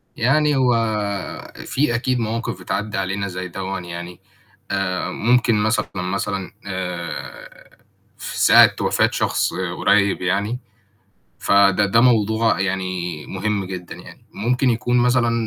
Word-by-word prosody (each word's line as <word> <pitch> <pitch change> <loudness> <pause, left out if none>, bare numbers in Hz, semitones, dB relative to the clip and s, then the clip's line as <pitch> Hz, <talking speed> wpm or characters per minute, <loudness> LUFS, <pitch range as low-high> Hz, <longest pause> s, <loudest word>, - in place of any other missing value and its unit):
يعني 150 +5 +2
هو 130 -2 +3 0.9
في 130 -3 0
أكيد 125 +1 0
مواقف 115 -4 -3
بتعدِّى 100 +3 -3
علينا 95 +1 -2
زي 95 0 -5
دوًّا 95 +1 -4
يعني، 85 0 -8 0.5
آآ 95 -2 -1
ممكن 120 0 +2
مثلًا، 110 +3 +1
مثلًا 95 +1 -3
آآ 90 -4 -6 0.5
في - - -6
ساعة - - +7
وفاة - - +2
شخص - - 0
قريِّب 95 +2 +1
يعني، 100 +6 0 0.8
فده 100 0 +4
ده 115 +4 +3
موضوع 110 -3 +3
يعني 95 -4 -3
مهم 100 +1 -2
جدًا 90 -1 -7
يعني، - - -14
وممكن 125 +4 +1
يكون 120 +1 +1
مثلًا 120 -1 +3
100 Hz, 120 wpm, -21 LUFS, 95-115 Hz, 0.9 s, ساعة